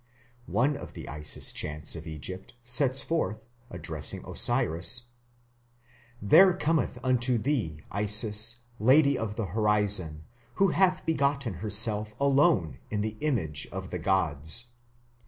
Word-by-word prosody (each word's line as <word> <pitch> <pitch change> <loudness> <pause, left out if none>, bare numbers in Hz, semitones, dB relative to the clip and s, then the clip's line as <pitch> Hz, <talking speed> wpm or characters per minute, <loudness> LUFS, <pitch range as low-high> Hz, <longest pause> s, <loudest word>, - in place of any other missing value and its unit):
One 120 +11 +1
of - - -10
the - - -9
Isis 75 +1 +1
chants 75 +1 -1
of 80 0 -9
Egypt 90 +7 -7
sets 130 +2 +2
forth, 110 -9 -3 0.2
addressing 80 - -3
Osiris: 90 +10 +1 1.1
There 180 - +6
cometh 160 -6 -1
unto 125 -1 +2
thee 110 - -2
Isis, 105 +3 +1 0.2
lady 140 +5 +4
of 110 -4 -4
the 115 - -3
horizon, 105 -7 0 0.3
who 195 0 +3
hath 185 +1 +1
begotten 140 -6 0
herself 105 0 +1
alone 140 - +2
in 105 -1 -2
the 110 0 -3
image 95 - -1
of 95 0 -7
the 90 - -4
gods.... 85 +4 0
110 Hz, 120 wpm, -27 LUFS, 90-135 Hz, 1.1 s, There